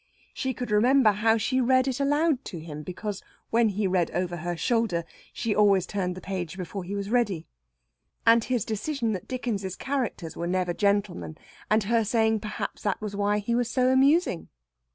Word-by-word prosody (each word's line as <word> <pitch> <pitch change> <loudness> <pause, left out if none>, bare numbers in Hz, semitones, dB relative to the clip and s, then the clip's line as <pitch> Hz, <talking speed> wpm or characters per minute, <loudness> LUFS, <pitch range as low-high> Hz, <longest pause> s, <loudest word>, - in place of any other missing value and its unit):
She 265 -2 -2
could 245 -2 -5
remember 240 +2 +5
how 220 +2 +2
she 255 +4 +1
read 255 +1 +3
it 265 0 -1
aloud 290 0 +2
to 175 - -6
him, 155 -2 -7
because, 190 +5 -5 0.3
when 230 -1 +4
he 205 +1 -1
read 185 -2 +1
over 175 -1 -1
her 175 +1 -3
shoulder, 225 -6 +1 0.3
she 225 - -1
always 200 -3 +4
turned 180 -3 -2
the 185 - -8
page 185 -1 -4
before 185 +1 -5
he 195 +3 -5
was 200 +1 -4
ready. 205 -9 +1 0.8
And 230 0 +6
his 245 -4 -1
decision 230 +2 -2
that 185 -4 -4
Dickens's 210 -7 -3
characters 250 - -3
were 170 - -3
never 180 -1 0
gentlemen, 200 -5 0 0.3
and 215 0 +3
her 225 +3 +2
saying 220 0 +2
perhaps 210 +1 -5
that 205 - -1
was 210 -2 -5
why 205 +1 +1
he 210 +3 -2
was 240 0 +1
so 255 0 +2
amusing. 270 - +3
210 Hz, 185 wpm, -26 LUFS, 185-245 Hz, 0.8 s, And